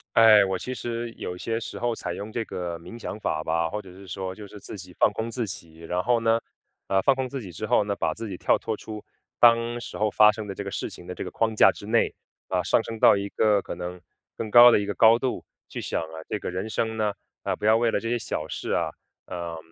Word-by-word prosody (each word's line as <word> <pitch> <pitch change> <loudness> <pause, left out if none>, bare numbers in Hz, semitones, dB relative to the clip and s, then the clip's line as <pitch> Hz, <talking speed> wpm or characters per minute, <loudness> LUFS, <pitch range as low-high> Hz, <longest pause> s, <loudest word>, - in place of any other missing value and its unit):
哎， 110 -3 +8
我 95 0 -1
其 130 - -5
实， 120 -1 -4
有 90 - -5
些 115 +5 -2
时 115 - -7
候 120 -1 0
采 90 - -4
用 105 +4 -6
这 115 0 -2
个 85 -4 -4
冥 115 +8 -11
想 110 - -6
法 80 -6 -1
吧， 85 +1 0
或 105 +6 -4
者 95 - -13
是 95 +2 -13
说， 95 +1 -5
就 105 - -9
是 105 +1 -11
自 100 - -8
己 90 -1 -10
放 - - +5
空 110 +3 -3
自 120 -2 -2
己。 80 -3 -8
然 90 +2 -2
后 120 0 +3
呢， 115 0 +2 0.5
呃， 95 0 +2
放 135 +6 +4
空 130 -1 -2
自 135 +1 -5
己 95 -5 -9
之 85 +6 -5
后 105 - +3
呢， 100 0 -2
把 - - -1
自 115 -1 -6
己 95 - -5
跳 - - +3
脱 110 -1 -3
出， 105 0 -8 0.4
当 120 0 +5
时 - - -7
候 105 0 +1
发 105 +1 +7
生 105 0 -6
的 100 - -5
这 100 - -5
个 100 - -5
事 - - -3
情 85 - -11
的 90 - -6
这 - - -5
个 - - -7
框 110 -1 0
架 - - +7
之 100 - -11
内， 115 +1 +2 0.4
啊， 90 -1 +1
上 100 +5 +2
升 115 0 -6
到 - - +7
一 100 0 -3
个 105 -1 +3
可 - - -5
能， 90 +1 -6 0.4
更 110 -2 -4
高 120 +1 +10
的 115 - +5
一 100 - -2
个 105 - -2
高 115 +2 +6
度， 130 0 -2 0.2
去 - - -6
想 - - -2
啊， 80 0 -8
这 110 - -1
个 100 - -5
人 95 +4 -4
生 110 0 -1
呢， 105 -1 +1 0.3
呃， - - -1
不 - - -6
要 110 +1 +6
为 115 +1 +3
了 - - +1
这 115 - -5
些 120 +1 0
小 80 -8 -4
事 - - -5
啊， - - 0 0.3
呃， 85 -2 -5
105 Hz, 290 characters per minute, -26 LUFS, 95-115 Hz, 0.5 s, 高